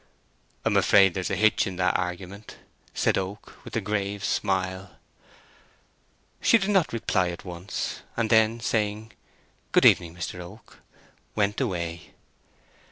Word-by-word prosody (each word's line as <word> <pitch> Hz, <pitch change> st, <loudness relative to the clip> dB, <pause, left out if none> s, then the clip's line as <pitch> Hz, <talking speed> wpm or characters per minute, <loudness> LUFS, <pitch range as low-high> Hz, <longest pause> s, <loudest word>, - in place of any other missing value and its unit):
"I'm -, -, +3 dB
afraid 95 Hz, -2 st, +5 dB
there's 95 Hz, 0 st, -3 dB
a -, -, 0 dB
hitch 110 Hz, +2 st, +3 dB
in 95 Hz, -, -5 dB
that 90 Hz, 0 st, +1 dB
argument," 90 Hz, +3 st, -5 dB, 0.3 s
said -, -, +1 dB
Oak, 100 Hz, +3 st, -8 dB
with -, -, -9 dB
a 115 Hz, -, +1 dB
grave 100 Hz, -1 st, -2 dB
smile. 95 Hz, -1 st, -1 dB, 1.5 s
She 230 Hz, -, +5 dB
did 200 Hz, -1 st, -1 dB
not 190 Hz, -5 st, +3 dB
reply 95 Hz, -5 st, 0 dB
at 85 Hz, -, -8 dB
once, 90 Hz, +2 st, -5 dB, 0.2 s
and 115 Hz, -2 st, 0 dB
then 110 Hz, +1 st, +4 dB
saying, 110 Hz, -1 st, -1 dB, 0.6 s
"Good -, -, +4 dB
evening, 85 Hz, -2 st, +5 dB
Mr. 90 Hz, +1 st, -5 dB
Oak," 90 Hz, +6 st, -12 dB, 0.6 s
went 105 Hz, 0 st, 0 dB
away. 85 Hz, -3 st, -4 dB
100 Hz, 135 wpm, -26 LUFS, 90-110 Hz, 1.5 s, afraid